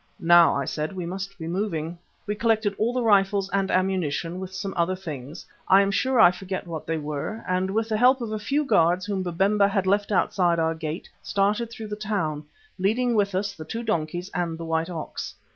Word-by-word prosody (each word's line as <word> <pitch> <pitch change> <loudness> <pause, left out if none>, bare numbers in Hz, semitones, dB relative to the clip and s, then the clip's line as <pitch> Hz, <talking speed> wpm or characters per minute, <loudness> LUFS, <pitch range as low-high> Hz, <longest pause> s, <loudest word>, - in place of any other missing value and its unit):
"Now," 170 0 +6
I 140 - -1
said, 155 +7 -3
"we 180 -2 -4
must 195 +3 -5
be 160 - -7
moving." 170 -2 -2 0.3
We 210 - -1
collected 220 -1 +1
all 225 +3 +2
the 250 0 -1
rifles 200 -2 +3
and 195 -1 +1
ammunition, 180 -2 0
with 190 0 -6
some 190 +1 -4
other 175 +2 +1
things, 155 -4 -8 0.2
I 195 +1 +6
am 200 - 0
sure 255 +5 +1
I 175 -5 +8
forget 185 +1 -5
what 165 -3 -6
they 165 - 0
were, 150 +8 -4
and 185 +1 0
with 220 +3 0
the 215 - +1
help 255 +3 +5
of 230 -3 -4
a 215 - -2
few 280 +8 0
guards 180 -5 +3
whom 200 -2 -2
Babemba 195 +3 +2
had 195 -1 0
left 200 +2 +1
outside 180 -3 +2
our 165 0 +1
gate 160 +1 -5
started 205 +4 0
through 225 -2 -8
the 210 - -3
town, 195 -9 -2 0.3
leading 235 +6 +1
with 200 -3 +1
us 200 +1 -1
the 160 - -9
two 225 +9 -5
donkeys 175 -3 -2
and 170 -2 -2
the 165 - -6
white 160 +1 -1
ox. 165 -3 -6
190 Hz, 210 wpm, -25 LUFS, 170-210 Hz, 0.3 s, I